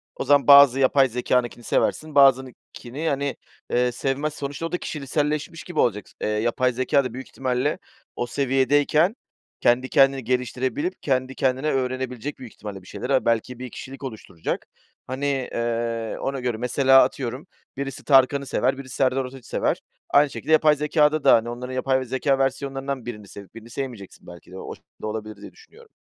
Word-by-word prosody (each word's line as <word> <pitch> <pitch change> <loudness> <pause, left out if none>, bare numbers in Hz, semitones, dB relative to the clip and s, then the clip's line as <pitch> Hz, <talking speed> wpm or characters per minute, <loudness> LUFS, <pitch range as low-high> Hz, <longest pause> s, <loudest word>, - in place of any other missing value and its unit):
o - - -3
zaman 145 +1 +3
bazı 140 -2 +8
yapay 135 0 +4
zekânınkini 120 0 -1
seversin, 155 +5 -1
bazınınkini, 135 +2 +1
hani, 140 0 -1 0.4
eee, 125 0 +2
sevmezsin, 140 +5 -2
sonuçta 140 +3 -4
o 165 - -4
da 180 - 0
kişiselleşmiş 150 +1 -3
gibi 175 -3 -5
olacak. 105 -4 +1
S - - -22
eee - - -1
yapay 120 +4 +1
zekâ 130 +3 +2
da 125 -3 -5
büyük 130 +2 -7
ihtimalle 130 +5 -1 0.4
o 120 - -3
seviyedeyken 140 - +2 0.5
kendi 125 +2 +2
kendini 135 -3 +4
geliştirebilir, 125 +7 -1
kendi 130 -1 -1
kendine 135 +3 0
öğrenebilecek 130 0 -3
büyük 125 -4 -10
ihtimalle 100 -3 -8
bir 90 - -18
şeyleri. 125 +3 -3
Ha, 130 - +2
belki 115 +2 0
bir 130 -1 -6
kişilik 135 +5 -10
oluşturacak. 110 -10 -5 0.4
Hani, 130 +2 -3
eee, 115 -4 -2
ona 135 0 -3
göre 125 -3 -2
mesela 135 +2 +5
atıyorum, 130 +1 -4 0.3
birisi 135 0 -5
Tarkan'ı 140 0 +4
sever 130 +1 0
birisi 130 -2 -8
Serdar 130 0 +1
Ortaç'ı 130 -1 -11
sever. - - 0 0.3
Aynı 145 0 +5
şekilde 155 - -5
yapay 155 -1 +5
zekâda 150 0 +2
da, - - +7
hani, 115 +1 0
onların 125 +2 -6
yapay, 130 +1 +1
eee, 130 - -5
zekâ 135 +2 0
versiyonlarından 135 -1 -2
birini 105 -4 -7
sevip 100 0 -12
birini 115 +1 -11
sevmeyeceksin 120 -6 -7
belki 85 0 -13
de 95 - -9
o - - -7
şekilde - - -14
olabilir 110 0 -5
diye - - -10
düşünüyorum. 450 +1 -19
130 Hz, 175 wpm, -23 LUFS, 120-140 Hz, 0.5 s, bazı